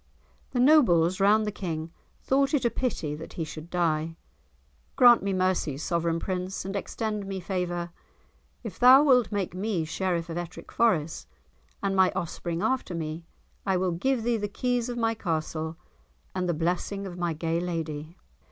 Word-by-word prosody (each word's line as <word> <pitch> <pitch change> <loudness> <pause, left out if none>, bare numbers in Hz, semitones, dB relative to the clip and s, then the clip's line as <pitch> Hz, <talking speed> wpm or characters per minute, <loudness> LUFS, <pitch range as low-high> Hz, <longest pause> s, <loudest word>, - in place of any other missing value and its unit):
The 245 - -2
nobles 195 - +5
round 210 +2 +4
the 210 - -1
King 165 -5 -4 0.3
thought 275 +2 +2
it 260 - 0
a 235 - +3
pity 220 - -2
that 155 +2 -8
he 165 - -3
should 155 +1 -8
die. 165 -2 0 0.8
"Grant 245 -3 +7
me 200 - -1
mercy, 185 -6 0
sovereign 165 +2 0
prince, 185 +1 -3
and 195 +1 -4
extend 210 0 -3
me 195 -1 -4
favour. 175 -2 -3 0.7
If - - -7
thou 255 +3 +8
wilt 250 -6 +4
make 200 -4 -2
me 185 -3 -1
Sheriff 175 0 -1
of 170 0 -4
Ettrick 175 0 -8
Forest, 170 -9 +1 0.6
and 195 -1 0
my 190 -1 +5
offspring 170 -1 -3
after 260 -9 0
me, 160 0 -5 0.4
I 190 -2 +1
will 185 0 0
give 230 +8 0
thee 235 0 +1
the 205 -1 -2
keys 245 +3 -1
of 240 - -4
my 225 -1 +1
castle, 160 -4 -3 0.6
and 185 -1 -1
the 170 - +1
blessing 180 +5 -1
of 180 -2 -7
my 175 -1 0
gay 165 +1 -1
lady." 165 -2 -4
185 Hz, 170 wpm, -27 LUFS, 165-215 Hz, 0.8 s, thou